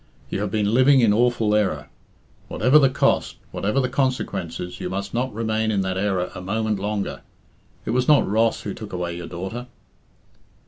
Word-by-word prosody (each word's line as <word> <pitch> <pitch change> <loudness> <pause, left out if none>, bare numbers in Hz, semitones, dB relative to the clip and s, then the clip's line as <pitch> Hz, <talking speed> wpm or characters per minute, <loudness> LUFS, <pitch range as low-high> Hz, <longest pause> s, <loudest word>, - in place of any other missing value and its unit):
You - - -1
have 105 - -1
been 105 +1 0
living 130 +2 +5
in 110 -3 +4
awful 115 -1 +2
error. 105 -2 0 0.6
Whatever 130 +7 +4
the 135 -2 +5
cost, 130 - +1 0.2
whatever 105 +7 0
the 130 - +1
consequences, 100 - -2
you - - -4
must 100 +2 -4
not 125 +2 -1
remain 110 0 -1
in 100 -3 +1
that 95 -1 -2
error 95 -2 -1
a 90 - -7
moment 105 +2 -1
longer. 105 0 -3 0.6
It - - -2
was 125 +1 +1
not 150 -2 +5
Ross 110 +3 +1
who - - -5
took 105 -3 -9
away 90 -1 -3
your 85 -1 -7
daughter." 95 +8 -6
105 Hz, 180 wpm, -23 LUFS, 95-120 Hz, 0.6 s, living